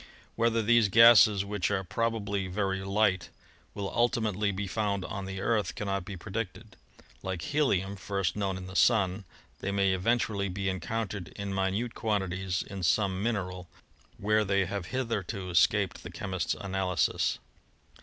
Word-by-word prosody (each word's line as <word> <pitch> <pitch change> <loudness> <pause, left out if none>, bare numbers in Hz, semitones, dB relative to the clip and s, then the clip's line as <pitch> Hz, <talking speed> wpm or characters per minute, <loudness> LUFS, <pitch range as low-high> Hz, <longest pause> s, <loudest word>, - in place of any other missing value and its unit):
Whether 115 -1 +2
these 115 -1 +4
gases, 105 -2 +7
which 105 -2 -1
are 100 -2 0
probably 100 -1 -1
very 95 0 -1
light, 95 -2 +1 0.5
will 100 -1 -3
ultimately 110 -4 +1
be 100 +1 -3
found 100 -1 -1
on 100 -1 -5
the 95 0 -5
Earth 110 0 0
cannot 100 -3 -2
be 95 0 -7
predicted. 110 +2 -6 0.5
Like 95 -3 -4
helium, 100 - +1
first 100 -3 -2
known 100 -2 -1
in 95 - -7
the 95 0 -9
Sun, 100 -3 +3 0.3
they - - -3
may 100 -1 +2
eventually 100 0 0
be 95 +1 -2
encoun 110 +4 -3
tered 95 -4 -7
in 100 -1 -5
minute 95 +5 -1
quantities 95 -3 -1
in 95 -1 -7
some 95 +1 +1
mineral 90 -6 -3 0.5
where 105 +1 +2
they 100 -1 +1
have 100 -1 -4
hitherto 110 -7 -3
escaped 85 - +2
the - - -8
chemist's 95 -4 -2
analysis. 95 -2 0
100 Hz, 150 wpm, -29 LUFS, 95-110 Hz, 0.5 s, gases